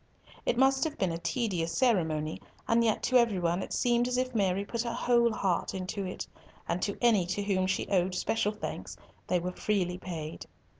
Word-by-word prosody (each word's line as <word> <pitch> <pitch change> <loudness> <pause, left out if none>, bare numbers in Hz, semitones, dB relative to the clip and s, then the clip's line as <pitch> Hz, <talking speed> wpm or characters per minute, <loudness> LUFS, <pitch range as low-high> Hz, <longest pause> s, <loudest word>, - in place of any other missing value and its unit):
It 235 - +2
must 265 +1 +4
have 310 -1 -3
been 190 -3 +1
a 165 - -3
tedious 180 -5 -1
ceremony, 160 -11 +1 0.3
and 230 0 +4
yet 220 -2 +1
to 255 - +4
every 230 -5 +3
one 175 +1 0
it - - -6
seemed 240 0 +2
as 250 0 0
if 255 0 -1
Mary 195 -2 +1
put 235 +2 -2
her 235 0 -3
whole 235 -1 +3
heart 190 -5 -1
into 190 +1 -3
it, 185 - -5 0.4
and 180 - -1
to 200 - -1
any 215 -7 +4
to 195 +3 -2
whom 190 -2 +1
she 190 - -1
owed 185 -1 +1
special 210 +2 0
thanks 210 - -6 0.3
they 180 - +2
were 180 +1 -3
freely 180 -2 -1
paid. 160 -4 -6
200 Hz, 200 wpm, -30 LUFS, 180-235 Hz, 0.4 s, must